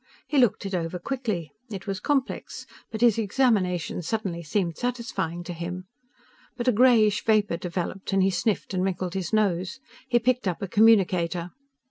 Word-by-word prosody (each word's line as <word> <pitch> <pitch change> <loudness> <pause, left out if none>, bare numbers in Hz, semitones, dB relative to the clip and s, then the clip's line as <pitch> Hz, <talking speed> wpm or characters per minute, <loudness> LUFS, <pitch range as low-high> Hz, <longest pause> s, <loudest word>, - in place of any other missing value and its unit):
He 295 - +1
looked 240 -4 +2
it 195 - -4
over 170 0 -2
quickly. 215 - -3 0.2
It 195 -4 -7
was 195 -2 -3
complex, 275 +1 -2 0.2
but 220 - -6
his 235 -2 +4
examination 200 -7 +1
suddenly 180 -1 -3
seemed 170 +1 -1
satisfying 235 -9 -3
to 175 - -6
him. 180 +2 -5 0.7
But 240 0 -3
a - - +6
grayish 220 -3 +4
vapor 210 -5 +2
developed 180 +2 -4
and 195 -1 +3
he 195 - +3
sniffed 205 +1 -1
and 185 -1 0
wrinkled 185 -1 -2
his 190 -3 -3
nose. 195 0 0 0.3
He 245 -2 +3
picked 245 -1 +1
up 180 - -1
a - - -2
communicator. 180 -5 +3
195 Hz, 165 wpm, -26 LUFS, 180-225 Hz, 0.7 s, a